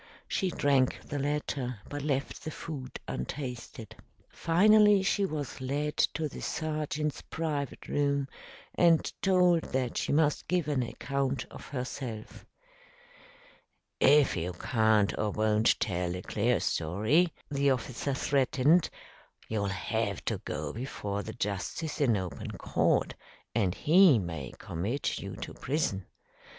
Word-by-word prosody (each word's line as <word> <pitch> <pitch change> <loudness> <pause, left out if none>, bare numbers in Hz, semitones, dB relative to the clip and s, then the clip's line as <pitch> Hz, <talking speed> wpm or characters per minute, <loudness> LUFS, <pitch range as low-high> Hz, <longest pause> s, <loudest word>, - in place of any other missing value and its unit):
She 190 - 0
drank 140 -5 +2
the 145 - -4
latter, 140 -4 -2
but 145 0 -5
left 140 -1 -2
the - - -4
food 145 -4 -7
untasted. 120 - -6 0.3
Finally, 210 +3 +5
she 200 0 +2
was 150 -6 -5
led 145 +3 -2 0.2
to 155 0 -1
the - - -9
sergeant's 150 -1 -2
private 150 -4 -4
room 140 -1 +1 0.5
and 170 -2 +3
told 180 -3 +4
that 130 -2 -1
she - - -1
must 150 0 +2
give 180 -4 +1
an 145 -4 +1
account 135 +2 -2
of - - -10
herself. 125 -4 -6 1.5
"If 145 +1 +5
you 90 +1 -2
can't 110 +1 +2
or 105 - +1
won't 110 +1 +2
tell 90 -2 -1
a 90 - -6
clear 115 0 +1
story," 110 - +2 0.2
the 140 0 +2
officer 130 +1 -1
threatened, 140 +5 +3 0.6
"you'll 105 -2 0
have 100 +1 -2
to - - -1
go 75 -1 -4
before 105 -5 -4
the - - -7
justice 105 - -3
in 120 -7 +4
open 90 -3 -5
court, - - +1 0.4
and 100 -5 +1
he 170 -3 +6
may 80 - -4
commit 105 - -2
you - - -6
to - - -7
prison. 130 - -2
135 Hz, 130 wpm, -30 LUFS, 110-150 Hz, 1.5 s, he